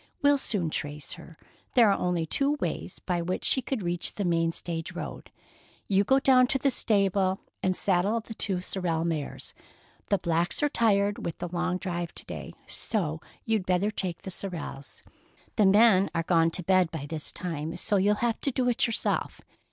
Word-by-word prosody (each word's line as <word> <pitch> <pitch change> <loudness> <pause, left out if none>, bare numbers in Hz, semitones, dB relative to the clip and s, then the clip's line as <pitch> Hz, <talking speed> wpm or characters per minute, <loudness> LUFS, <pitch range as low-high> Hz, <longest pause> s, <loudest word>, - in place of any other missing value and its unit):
We'll 285 0 +5
soon 180 -11 -1
trace 145 -1 -3
her. 165 -1 -12 0.4
There 230 -5 +6
are - - +3
only 175 -2 0
two 280 - +1
ways 175 +1 -3
by 180 -2 -2
which 180 +2 -2
she 260 - +3
could 255 -5 -3
reach 175 0 -1
the 200 - -2
main 165 -1 +2
stage 165 -1 -4
road. - - -7 0.6
You 195 0 +3
go 265 +6 +4
down 255 -2 +5
to 270 - +1
the 275 0 +2
stable 195 -4 +2 0.2
and 185 -1 +1
saddle 195 +5 +2
the 225 0 -9
two 195 -4 -1
sorrel 170 -3 -1
mares. 160 -4 -3 0.6
The 200 - +3
blacks 170 - 0
are 295 - +3
tired 205 -5 +2
with 170 - -4
the 175 - -5
long 180 +1 -1
drive 175 -2 -4
to - - -11
day, - - -7
so 160 -8 -2 0.2
you'd 220 -4 0
better 185 +3 +2
take 185 -5 -4
the 190 - -6
sorrels. 165 -8 -6 0.5
The 210 - +4
men 200 -1 +6
are 165 - +2
all 175 - +3
gone 165 0 +5
to 180 +2 -2
bed 185 -1 +3
by 160 -4 -5
this 155 0 -3
time, 165 -1 -4
so 205 +3 +1
you'll 205 +2 +3
have 230 -2 -1
to - - 0
do 255 0 0
it 240 - +2
yourself. 230 - -1
185 Hz, 190 wpm, -28 LUFS, 170-210 Hz, 0.6 s, There